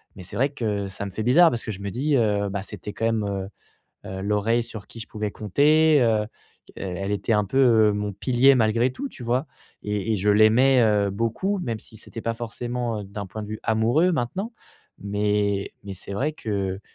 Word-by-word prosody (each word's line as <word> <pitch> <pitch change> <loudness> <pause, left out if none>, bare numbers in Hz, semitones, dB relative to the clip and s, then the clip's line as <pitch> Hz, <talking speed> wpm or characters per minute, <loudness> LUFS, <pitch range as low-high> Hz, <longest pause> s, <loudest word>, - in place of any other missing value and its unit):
mais 95 - -10
c'est 90 - -8
vrai 135 +3 +2
que 105 -6 -2
ça 95 +1 -6
me 100 - -6
fait 110 - -4
bizarre 165 +9 +6
parce 120 - -3
que 110 - -3
je 100 -1 -8
me 100 - -3
dis: 140 +7 0
«Heu, 105 -3 +1
bah 100 0 -3
c'était 105 0 -8
quand 110 - -6
même, 115 -2 +1
heu 100 -1 -3 0.6
heu, 95 0 -5
l'oreille 105 +4 +1
sur 110 -3 -8
qui - - -12
je 110 - -7
pouvais 105 -1 -3
compter, 150 - +4
heu 110 -2 +3
heu, - - -5 0.5
elle 95 +1 -4
était 105 +3 -1
un 105 0 +2
peu, 130 +8 -1 0.3
heu, - - 0
mon 105 0 -2
pilier 130 +6 +4
malgré 115 +2 +2
tout», 280 - -5
tu - - -11
vois? 125 +5 0 0.4
Et 105 +1 -2
et - - +1
je 105 +2 +1
l'aimais, 115 +5 +5
heu, 105 -2 +2
beaucoup, 115 - -1
même 115 -9 -3
si 110 - -15
c'était 115 +1 -9
pas 115 - -1
forcément 120 -1 -4
d'un 100 +1 -7
point 110 +3 -7
de 105 - -8
vue 110 0 -6
amoureux 115 +11 +3
maintenant 185 - -2 0.5
mais 100 0 -1
mais 100 - -6
c'est 95 - -8
vrai 140 +9 -1
que 100 -8 -3
110 Hz, 215 wpm, -24 LUFS, 100-120 Hz, 0.6 s, bizarre